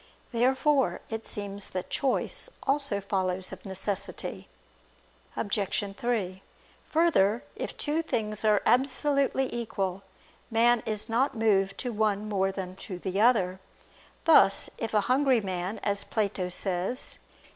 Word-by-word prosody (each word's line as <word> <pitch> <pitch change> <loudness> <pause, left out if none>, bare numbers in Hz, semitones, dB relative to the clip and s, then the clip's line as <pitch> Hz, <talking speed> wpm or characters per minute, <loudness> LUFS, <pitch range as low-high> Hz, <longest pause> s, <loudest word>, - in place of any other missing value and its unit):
Therefore 265 +3 +2
it 225 0 -4
seems 200 -1 -3
that 185 -1 -5
choice 275 - -1
also 275 -7 +2
follows 190 -2 -1
of 190 +1 -9
necessity. 190 +1 -4 0.9
Obj. 200 -1 -1
3: 200 -6 -2 0.5
Further, 305 - +3
if - - -5
two 305 +2 0
things 215 -9 -1
are 210 -2 +3
absolutely 270 +1 +2
equal, 195 -5 -2 0.5
man 235 +1 +4
is 215 -1 -2
not 240 +3 +1
moved 195 -3 +2
to 245 - -3
one 210 -1 0
more 195 -2 +1
than 185 -1 -6
to 190 -3 -7
the 190 +2 -2
other; 190 -6 +3 0.7
thus 305 -11 +5
if 225 -1 -3
a 210 - +5
hungry 255 +2 +3
man, 190 0 -3
as 200 -1 0
Plato 200 -4 -1
says 185 +6 -2
(Cf. - - -27
210 Hz, 130 wpm, -28 LUFS, 195-245 Hz, 0.9 s, thus